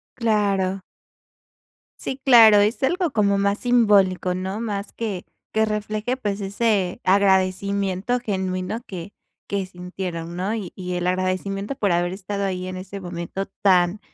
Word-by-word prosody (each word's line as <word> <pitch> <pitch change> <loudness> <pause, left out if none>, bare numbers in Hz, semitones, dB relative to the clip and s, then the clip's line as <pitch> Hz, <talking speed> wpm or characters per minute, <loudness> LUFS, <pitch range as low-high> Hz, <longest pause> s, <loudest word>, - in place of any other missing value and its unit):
Claro. 200 -4 +1 1.2
Sí, 265 - -4
claro, 230 -6 +8
es 215 +6 +1
algo 350 +5 +1
como 200 -5 +2
más 200 +1 +1
simbólico, 205 -7 +3
¿no? 190 +4 -4
Más 205 -3 -4
que 210 -6 -4 0.3
que 220 0 +2
refleje, 215 +3 -2
pues, 205 -5 -2
ese 200 -2 0
agradecimiento 195 +3 +2
genuino 190 -1 -3
que 185 +1 -8 0.3
que 200 -1 -1
sintieron, 180 -2 -6
¿no? 190 +4 -1
Y 205 -6 -4
y 180 -1 -5
el 175 0 -1
agradecimiento 185 +4 -1
por 205 -8 0
haber 175 +1 +1
estado 200 +1 -4
ahí 185 -1 -3
en 185 - -5
ese 195 +2 -7
momento 175 +2 -5 0.2
tan, 185 0 +4
195 Hz, 140 wpm, -23 LUFS, 185-210 Hz, 1.2 s, claro